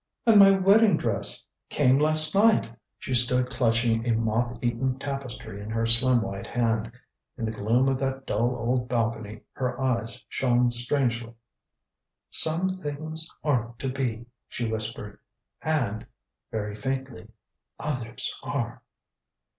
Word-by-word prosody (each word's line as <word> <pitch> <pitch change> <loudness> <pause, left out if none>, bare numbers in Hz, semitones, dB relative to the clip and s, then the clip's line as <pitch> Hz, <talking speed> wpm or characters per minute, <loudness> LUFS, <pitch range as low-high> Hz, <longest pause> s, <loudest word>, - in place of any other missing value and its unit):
"And 225 -3 +6
my 195 -1 +9
wedding 195 +3 +4
dress 110 -4 -2 0.2
came 135 -2 +3
last 155 +1 +6
night." 200 - +3 0.2
She 130 - -5
stood 125 +1 +2
clutching 115 -2 +1
a 115 - +2
moth 115 +2 -1
eaten 125 +2 -1
tapestry 130 -7 -7
in 105 - -8
her 115 +1 -1
slim 120 +1 +3
white 100 -1 -6
hand. 115 -1 -1 0.5
In 115 - -3
the 110 - -2
gloom 115 +5 +1
of 135 -1 0
that 135 0 -3
dull 120 +4 0
old 125 +1 -1
balcony 110 -3 -2
her 125 0 -4
eyes 120 -3 -2
shone 125 -1 +1
strangely. 120 -1 +2 1.0
"Some 165 +4 +5
things 160 -2 -5
aren't 120 -6 -1
to 135 - -4
be," 125 -3 -3 0.2
she 120 - -4
whispered. 110 -1 -5 0.4
"And" 120 -8 -2 0.4
very 105 -3 -4
faintly 130 -2 -5 0.5
"others 125 -6 -4
are." 120 -5 -4
120 Hz, 130 wpm, -26 LUFS, 115-135 Hz, 1.0 s, my